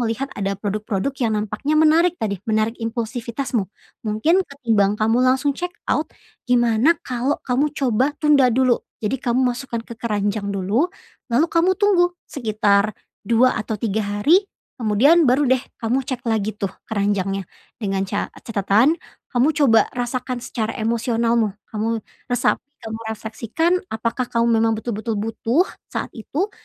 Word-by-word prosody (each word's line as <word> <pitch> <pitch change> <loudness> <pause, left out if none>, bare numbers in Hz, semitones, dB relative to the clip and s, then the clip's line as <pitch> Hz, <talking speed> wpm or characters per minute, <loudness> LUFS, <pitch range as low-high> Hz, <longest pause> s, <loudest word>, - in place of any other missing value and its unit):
melihat 235 +3 -1
ada 195 -1 -2
produk-produk 210 +3 -2
yang 220 -3 +1
nampaknya 215 +9 -1
menarik 320 +3 +4
tadi, 200 - -3
menarik 220 +2 0
impulsivitasmu. 230 0 -2 0.3
Mungkin 225 - +2
ketimbang 225 - +1
kamu 225 +3 +2
langsung 265 +3 +2
check 355 +5 -5
out 305 - 0 0.4
gimana 240 +6 +4
kalau 255 +3 -1
kamu 265 +4 +1
coba 265 +2 +1
tunda 290 -4 +4
dulu. 250 0 +3 0.2
Jadi 235 +4 -2
kamu 250 0 +2
masukkan 240 -2 -5
ke - - -9
keranjang 210 -2 -2
dulu, 200 - +1 0.4
lalu 260 +7 +3
kamu 355 +3 +3
tunggu 360 -4 +3
sekitar 215 -4 +1 0.3
2 235 0 +4
atau 215 0 -3
3 215 0 -1
hari. 205 - +3 0.4
Kemudian 265 +9 +4
baru 270 +4 +4
deh 260 - +3 0.2
kamu 245 +4 +2
cek 255 -2 -5
lagi 215 -2 -1
tuh 200 -3 -3 0.2
keranjangnya 200 -2 0 0.3
dengan 195 -4 -1
ca 205 - -2
catatan 225 - +2 0.3
kamu 250 +3 +3
coba 235 -8 +4
rasakan 250 0 -3
secara 225 -2 -3
emosionalmu. 230 -1 +1 0.2
Kamu 225 +1 -2 0.3
resap 245 - +2 0.3
kamu 220 0 -5 0.2
refleksikan 230 - -1 0.2
apakah 230 +3 -1
kamu 230 -1 +2
memang 225 0 +2
betul-betul 220 0 -3
butuh 225 - +1 0.2
saat - - -4
itu? 305 - -3
230 Hz, 140 wpm, -21 LUFS, 215-265 Hz, 0.4 s, menarik